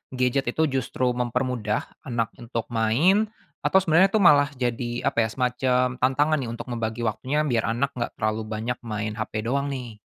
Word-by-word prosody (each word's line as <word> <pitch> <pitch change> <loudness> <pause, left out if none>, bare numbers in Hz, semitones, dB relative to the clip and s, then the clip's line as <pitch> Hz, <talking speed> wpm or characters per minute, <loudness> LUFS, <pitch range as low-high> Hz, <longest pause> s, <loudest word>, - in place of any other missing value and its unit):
gadget 125 +1 +1
itu 160 +6 +1 0.2
justru 130 -1 -1
mempermudah 125 -3 -1 0.2
anak 115 -3 -1
untuk 115 -1 -4
main, 150 - +3 0.4
atau 190 - +5
sebenarnya 175 +2 +5
itu 215 -1 +2
malah 145 -4 +7
jadi, 120 -1 -2 0.2
apa 115 -1 +2
ya, - - -9
semacam 125 0 +1
tantangan 145 +4 +2
ya, - - -5
untuk 115 - -7
membagi 115 0 -3
waktunya, 135 +7 0
biar 120 -8 0
anak 140 +3 0
enggak 120 - -3
terlalu 110 0 -1
banyak 110 +3 -3
main 110 -1 -3
HP 110 0 -3
doang, 140 +4 0
nih? 125 -6 -6
125 Hz, 170 wpm, -25 LUFS, 115-135 Hz, 0.4 s, malah